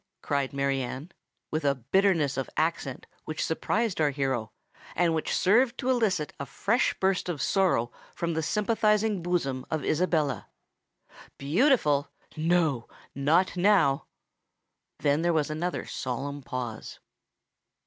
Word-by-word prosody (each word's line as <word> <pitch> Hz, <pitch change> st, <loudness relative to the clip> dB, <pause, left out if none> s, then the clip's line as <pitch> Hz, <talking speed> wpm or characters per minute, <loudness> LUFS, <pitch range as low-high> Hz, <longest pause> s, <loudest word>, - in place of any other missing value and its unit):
cried 140 Hz, -2 st, 0 dB
Mary 140 Hz, -1 st, 0 dB
Anne, 130 Hz, +7 st, -6 dB, 0.4 s
with 155 Hz, 0 st, -1 dB
a 140 Hz, -1 st, +2 dB
bitterness 155 Hz, -, +2 dB
of 135 Hz, -, -3 dB
accent 155 Hz, -5 st, -1 dB, 0.2 s
which 155 Hz, -, -2 dB
surprised 200 Hz, +3 st, -1 dB
our 150 Hz, -, +4 dB
hero, 135 Hz, -5 st, -2 dB, 0.4 s
and 170 Hz, -1 st, +2 dB
which 160 Hz, -, -1 dB
served 240 Hz, +6 st, +3 dB
to 260 Hz, -1 st, 0 dB
elicit 200 Hz, -, 0 dB
a 140 Hz, -, -3 dB
fresh 225 Hz, -, +1 dB
burst 190 Hz, -1 st, +1 dB
of 165 Hz, -5 st, -3 dB
sorrow 165 Hz, -, +2 dB, 0.2 s
from 170 Hz, 0 st, -2 dB
the 160 Hz, -, 0 dB
sympathising 210 Hz, +2 st, +1 dB
bosom 150 Hz, -7 st, -1 dB
of 155 Hz, -2 st, -2 dB
Isabella: 155 Hz, -, 0 dB, 0.9 s
"beautiful—no, 155 Hz, -, +1 dB, 0.3 s
not 155 Hz, +8 st, +2 dB
now!" 175 Hz, -7 st, +3 dB, 0.9 s
Then 145 Hz, +1 st, +1 dB
there 170 Hz, 0 st, +2 dB
was 155 Hz, -1 st, 0 dB
another 175 Hz, +4 st, -2 dB
solemn 140 Hz, +3 st, -4 dB
pause. 125 Hz, -4 st, -6 dB
155 Hz, 125 wpm, -28 LUFS, 140-185 Hz, 0.9 s, our